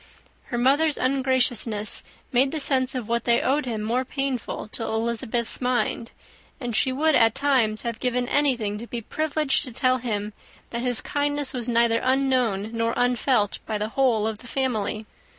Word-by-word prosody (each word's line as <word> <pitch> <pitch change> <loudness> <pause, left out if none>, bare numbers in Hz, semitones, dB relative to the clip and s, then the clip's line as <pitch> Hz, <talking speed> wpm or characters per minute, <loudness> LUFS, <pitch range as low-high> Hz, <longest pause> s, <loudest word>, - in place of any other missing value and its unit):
Her 240 - -4
mother's 280 +5 +3
ungraciousness 255 -5 +1 0.3
made 260 +2 +3
the 315 - -2
sense 265 -2 +2
of 245 -4 -4
what 235 0 -1
they 235 -1 +4
owed 280 0 0
him 220 -3 -3
more 240 +4 0
painful 265 -5 -3
to 230 - -5
Elizabeth's 230 +1 -1
mind; 245 -2 -1 0.5
and 240 -4 -3
she 260 - +3
would, 310 +4 +2
at 225 -4 +4
times, 255 -7 +1
have 235 -2 -4
given 250 -1 0
anything 245 -8 +1
to 235 - -8
be 235 0 -5
privileged 305 +3 0
to 255 - -7
tell 255 +2 +1
him, 210 -3 -3 0.4
that 235 - -3
his 245 -2 +1
kindness 290 -1 -1
was 245 -2 -3
neither 230 -1 +3
unknown 255 -6 +1
nor 230 0 -1
unfelt 245 -3 +1
by 215 - -1
the 210 +1 -3
whole 235 -4 +2
of 220 -1 -3
the 245 - -12
family. 220 -5 -2
245 Hz, 170 wpm, -24 LUFS, 225-265 Hz, 0.5 s, they